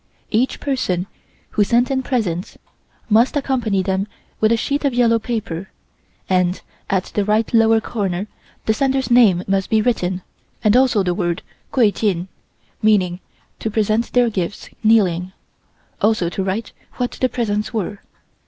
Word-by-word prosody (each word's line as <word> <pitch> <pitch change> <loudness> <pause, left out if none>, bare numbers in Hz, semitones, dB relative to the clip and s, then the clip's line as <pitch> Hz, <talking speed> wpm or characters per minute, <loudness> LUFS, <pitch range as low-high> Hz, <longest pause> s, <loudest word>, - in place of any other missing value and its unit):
Each 235 +4 +1
person 190 -11 -1 0.5
who 210 - +3
sent 240 +5 +2
in 265 -1 +1
presents 210 -10 -2 0.5
must 230 +7 +3
accompany 240 -9 0
them 190 +1 -1 0.3
with 220 0 +3
a 230 - +4
sheet 285 +6 -1
of 275 -4 +1
yellow 230 -2 +4
paper, 210 -6 -4 0.6
and 180 -1 +1 0.3
at 190 -2 -1
the 205 - +1
right 215 +3 +1
lower 225 -1 +5
corner 200 -4 -2 0.4
the 220 - +3
sender's 265 +2 0
name 210 -8 +5
must 195 -1 0
be 220 - +3
written 190 -6 0 0.4
and 210 +1 +4
also 250 -5 +4
the 180 -1 0
word 175 -2 -2 0.3
Kuai 230 -6 +4
Jin, 190 -4 -1 0.5
meaning 190 -5 +2 0.4
to 220 - -2
present 215 +2 0
their 245 -2 +3
gifts 190 0 -4
kneeling, 185 -5 +3 0.7
also 210 -5 +2
to 190 - -3
write 195 +4 -3 0.2
what 245 -1 -1
the 255 - +3
presents 210 -4 -1
were. 210 -3 -3
215 Hz, 150 wpm, -20 LUFS, 190-235 Hz, 0.7 s, lower